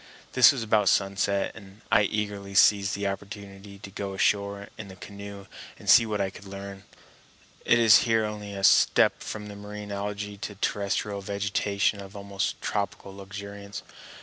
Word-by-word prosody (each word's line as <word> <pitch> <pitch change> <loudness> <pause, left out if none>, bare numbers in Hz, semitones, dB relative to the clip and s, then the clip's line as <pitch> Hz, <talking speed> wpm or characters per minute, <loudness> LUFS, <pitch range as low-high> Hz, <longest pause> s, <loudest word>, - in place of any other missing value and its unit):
This 125 0 +8
was 130 -5 -3
about 105 -3 +3
sunset, 100 0 +1
and 100 0 -14
I 100 +1 +5
eagerly 100 -1 -3
seized 100 +1 +5
the 100 0 -3
opportunity 100 0 -7
to 100 -1 -11
go 100 -1 -5
ashore 100 +1 0
in 110 - -8
the 95 - -11
canoe 100 +1 -9 0.3
and - - -14
see 115 - +7
what 105 -1 -2
I 95 -1 -1
could 100 - -13
learn. 100 0 -9 0.8
It 120 - +5
is 115 -3 +7
here 115 -2 +2
only 105 -1 -6
a 95 - -6
step - - +5
from 105 -1 -6
the 105 - -9
marine 105 0 -8
algæ 100 0 -5
to 105 - -5
terrestrial 100 0 -2
vegetation 100 +1 -1
of 95 +1 -11
almost 100 0 -3
tropical 100 -1 -3
luxuriance. 100 +1 -8
100 Hz, 165 wpm, -27 LUFS, 100-105 Hz, 0.8 s, This